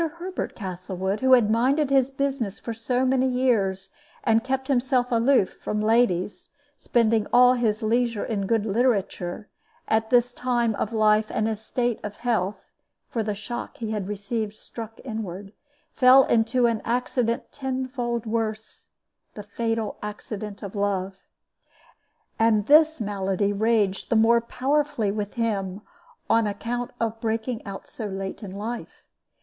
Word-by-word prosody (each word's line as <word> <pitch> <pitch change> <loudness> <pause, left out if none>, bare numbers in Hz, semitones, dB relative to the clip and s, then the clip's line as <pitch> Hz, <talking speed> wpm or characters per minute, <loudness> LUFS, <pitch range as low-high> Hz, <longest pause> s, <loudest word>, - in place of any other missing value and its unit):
Herbert 365 +2 -5
Castlewood, 190 0 -4
who 260 0 +4
had 230 -4 +5
minded 270 +5 +2
his 270 -1 +4
business 270 -7 -2
for 230 - -5
so 245 +3 0
many 260 0 +2
years, 215 -7 0 0.3
and 225 0 +3
kept 265 0 -2
himself 255 -1 +1
aloof 235 -3 +3
from 210 - -1
ladies, 215 -4 +1 0.3
spending 230 -5 +1
all 250 +1 +7
his 225 -3 0
leisure 230 0 +1
in 200 -4 -2
good 225 -1 +1
literature, 205 -4 0 0.4
at 220 0 +1
this 245 0 +3
time 240 -3 0
of 215 - -3
life 215 -1 +3
and 215 - 0
in - - 0
this 215 0 -10
state 240 0 -1
of 205 0 -5
health 220 -5 -1 0.5
(for 230 - -1
the 210 -1 -2
shock 215 +4 -6
he 225 -2 -4
had 205 -3 -3
received 210 +1 -3
struck 225 -1 -9
inward), 205 -4 -6 0.4
fell 260 +1 +7
into 235 +2 +2
an 230 -2 +1
accident 240 -1 -1
tenfold 255 -3 -3
worse 220 -1 -4 0.5
the 210 - -7
fatal 225 +1 -3
accident 210 0 -6
of 200 - -6
love. 195 -2 -1 1.2
And 220 -2 +3
this 310 +4 +5
malady 200 -1 -1
raged 210 -2 +1
the 235 - +2
more 230 +1 +5
powerfully 260 -3 0
with 205 -1 -4
him 200 -4 -2 0.5
on 225 -1 +3
account 235 +4 -3
of 225 -1 -2
breaking 225 +1 -2
out 195 -1 -7
so 220 - -5
late 195 +1 -5
in 205 - -7
life. 225 +4 -6
225 Hz, 145 wpm, -25 LUFS, 205-245 Hz, 1.2 s, all